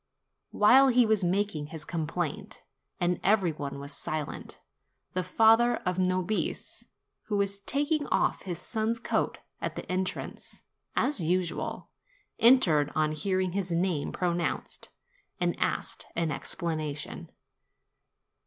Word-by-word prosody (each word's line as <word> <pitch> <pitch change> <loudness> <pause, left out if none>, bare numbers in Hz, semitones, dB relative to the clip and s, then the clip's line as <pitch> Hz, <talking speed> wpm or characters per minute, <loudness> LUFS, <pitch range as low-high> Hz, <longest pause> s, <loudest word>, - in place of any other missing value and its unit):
While 255 +6 +6
he 250 -2 +5
was 215 -3 +2
making 180 -4 0
his 155 0 -8
com 160 -3 -3
plaint, 180 +6 -4 0.4
and 175 -1 +1
every 195 -3 +3
one 145 -2 -5
was 140 +1 -7
silent, 155 0 -5 0.5
the 185 - 0
father 225 +6 +4
of 180 0 0
Nobis, 185 +3 -1 0.4
who 210 -1 -1
was 200 0 0
taking 290 +6 +1
off - - +1
his 180 -3 -4
son's 220 +5 -1
coat - - -1 0.2
at - - -3
the - - -6
entrance, 185 0 -4 0.3
as 295 - +2
usual, 175 +1 -2 0.5
entered 180 - +5
on 155 -1 +2
hearing 185 +4 0
his 185 -1 -2
name 170 -3 0
pronounced, 175 -1 -2 0.5
and - - +1
asked - - -1
an 165 -2 0
explanation. 155 -2 -3
185 Hz, 125 wpm, -29 LUFS, 165-215 Hz, 0.5 s, While